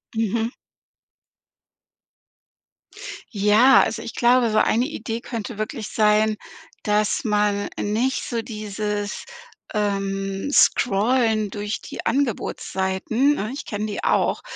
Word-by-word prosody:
Mhm. 225 +1 0 2.8
Ja, 210 +6 +6
also 225 +1 -1
ich 230 - -7
glaube, 240 -1 +3
so 215 - +3
eine 240 +3 +2
Idee 235 -6 -4
könnte 230 -2 -6
wirklich 215 +1 -4
sein, 215 0 +3 0.5
dass 210 0 +1
man 210 -2 +1
nicht 230 +6 0
so 230 -2 -3
dieses, 210 -1 -4 0.5
ähm, 195 0 -2
Scrollen 220 -3 +3
durch 205 +2 -4
die - - -8
Angebotsseiten- 230 -1 0
ne, 215 -6 -3
ich 275 - -6
kenne 210 0 -3
die 205 - -5
auch- - - +1
215 Hz, 105 wpm, -23 LUFS, 205-235 Hz, 2.8 s, Ja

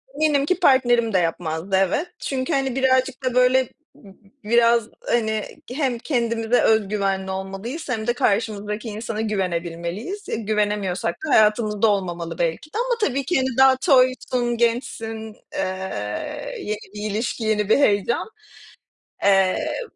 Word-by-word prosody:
eminim 295 -2 +2
ki 365 +4 0
partnerim 240 - +3
de 185 - +4
yapmazdı, 165 +1 -1
evet. 280 - 0
Çünkü 270 +3 -2
hani, 270 -2 0
birazcık 260 -1 +1
da 255 -1 0
böyle 255 +1 +4 0.3
b 195 -2 -16 0.3
biraz 235 +1 +4 0.2
hani, 220 -2 +1 0.3
hem 260 -4 -1
kendimize 230 -3 0
öz 220 -3 +3
güvenli 195 -2 -1
olmalıyız 195 - -5
hem 220 -3 -2
de 240 - +3
karşımızdaki 210 -1 -1
insana 215 +1 -4
güvenebilmeliyiz. 185 - -3
E - - -1
güvenemiyorsak 205 -5 -1
da - - -4
hayatımızda 215 0 +3
olmamalı 175 -5 -2
belki 170 - -2
de. - - -3
Ama 485 +1 +1
tabii 275 +1 -2
ki 360 - 0
hani, 260 0 +1
daha 265 0 +7
toysun, 255 -3 +2
gençsin, 225 -2 -2 0.2
eee, 185 - -4
yeni 215 - -3 0.2
bir 210 0 -3
ilişki, 225 +2 -2
yeni 210 -2 0
bir - - +5
heyecan. 210 -2 +2 1.0
Eee 195 - +2
220 Hz, 140 wpm, -22 LUFS, 200-255 Hz, 1.0 s, daha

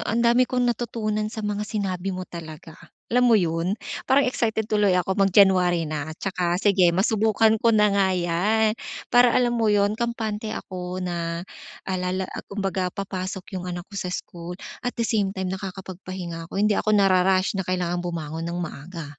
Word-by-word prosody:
ang 230 +2 +1
dami 240 +2 +5
kong 250 -1 0
natutunan 225 -3 -1
sa 220 0 -6
mga 210 0 -2
sinabi 195 -3 -2
mo 185 -1 -3
talaga. 160 -2 -9 0.4
Alam 250 +1 +4
mo 230 - +6
'yon? 170 +1 0 0.3
Parang 275 +2 +5
excited 220 -3 0
tuloy 210 -3 +2
ako 180 +1 +1
mag 195 - +5
January 180 -3 +4
na 150 -1 -4
saka 180 -2 -1
sige 195 -2 +4
masubukan 220 +4 +3
ko 230 - +3
na 210 -2 +4
nga 200 -1 +3
'yan. 200 +6 +2 0.4
Para 245 0 +6
alam 245 -1 +3
mo 230 -2 +1
'yon, 205 0 +3
kampante 220 -2 -3
ako 180 0 -5
na 170 -1 -3 0.4
alala 185 0 -2
ah, - - -5
kumbaga 195 -2 -1
papasok 190 -1 -5 0.2
yung 180 - -6
anak 175 0 -5
ko - - -9
sa 185 - -3
school 175 -1 -6 0.2
at 245 - -4
the 230 - 0
same 205 -3 0
time 190 -1 -2
nakakapag-pahinga 185 -3 -6
ako - - -7
hindi 210 +1 +3
ako 215 0 +2
na-rarush 190 -1 +3
na - - -3
kailangang 180 -1 -1
bumangon 165 -2 -4
nang 170 - -3
maaga. 170 0 -6
190 Hz, 175 wpm, -24 LUFS, 180-215 Hz, 0.4 s, mo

